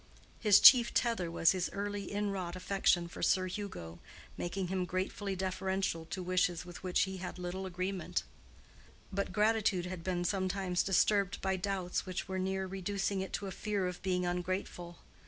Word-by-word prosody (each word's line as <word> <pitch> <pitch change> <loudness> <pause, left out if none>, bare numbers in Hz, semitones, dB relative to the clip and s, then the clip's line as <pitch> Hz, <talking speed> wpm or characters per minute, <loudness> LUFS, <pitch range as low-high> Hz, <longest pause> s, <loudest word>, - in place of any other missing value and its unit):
His 210 -3 +6
chief 240 -3 +8
tether 230 -8 +1
was 165 0 +4
his 185 -2 -1
early 205 0 -3
inwrought 195 -4 -2
affection 185 -2 +1
for 170 - -9
Sir 185 -1 +3
Hugo, 175 - -6 0.4
making 180 +1 -3
him 190 -1 0
gratefully 190 +2 -2
deferential 190 -2 -1
to 180 +3 -5
wishes 180 -1 +1
with 175 -1 -10
which 185 -1 +1
he 190 -1 -1
had 180 0 -6
little 180 +1 -4
agreement: 185 +1 -2 0.9
but 200 0 -1
gratitude 210 -3 +2
had 180 -2 -6
been 175 -1 -1
sometimes 185 -1 0
disturbed 195 0 +2
by 190 0 +1
doubts 185 -1 -2
which 185 0 -4
were 190 0 -3
near 190 +1 -1
reducing 195 +1 -2
it 190 - -5
to 200 - -2
a 195 - -4
fear 205 -1 -2
of 180 0 -4
being 180 -1 0
ungrateful. 175 -1 -3
185 Hz, 165 wpm, -33 LUFS, 180-195 Hz, 0.9 s, chief